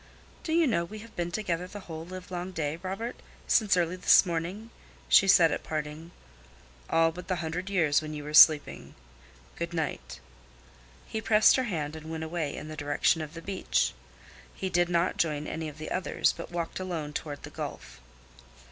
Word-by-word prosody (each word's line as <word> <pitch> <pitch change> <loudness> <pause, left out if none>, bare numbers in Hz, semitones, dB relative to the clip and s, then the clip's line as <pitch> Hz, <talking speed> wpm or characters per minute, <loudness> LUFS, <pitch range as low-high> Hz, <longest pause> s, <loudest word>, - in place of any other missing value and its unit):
"Do 315 - -5
you 330 0 +4
know 205 - +1
we 210 +5 -8
have 230 - -18
been 175 0 -2
together 180 -3 -2
the 205 +2 -9
whole 160 -3 -7
livelong 185 0 -6
day, 155 -1 -2
Robert—since 200 0 -1
early 175 0 +1
this 185 - +6
morning?" 180 +6 -4 0.4
she 195 - +6
said 170 -4 +6
at - - -2
parting. 155 +1 -5 0.8
"All 165 0 +3
but 180 +1 -10
the 185 - 0
hundred 175 +3 -4
years 160 -7 +2
when 155 0 -6
you 150 - -6
were 150 +1 -7
sleeping. 150 -1 +6 0.6
Good 170 0 -4
night." 160 - -4 0.9
He 220 - -4
pressed 215 -1 +5
her 260 - +1
hand 155 -8 -3
and 160 0 -9
went 160 0 -4
away 160 -3 -3
in - - -7
the 155 - -7
direction 145 +2 +1
of 155 +1 -7
the 165 - -8
beach. 195 -1 0 0.6
He 190 -1 -4
did 175 0 +2
not 170 +1 +1
join 150 -2 0
any 160 0 -4
of 150 - -13
the 155 - -7
others, 185 - +1
but - - -8
walked 170 0 -3
alone 165 -5 -4
toward 145 -1 -5
the - - -9
Gulf. - - -7
170 Hz, 185 wpm, -28 LUFS, 155-185 Hz, 0.9 s, this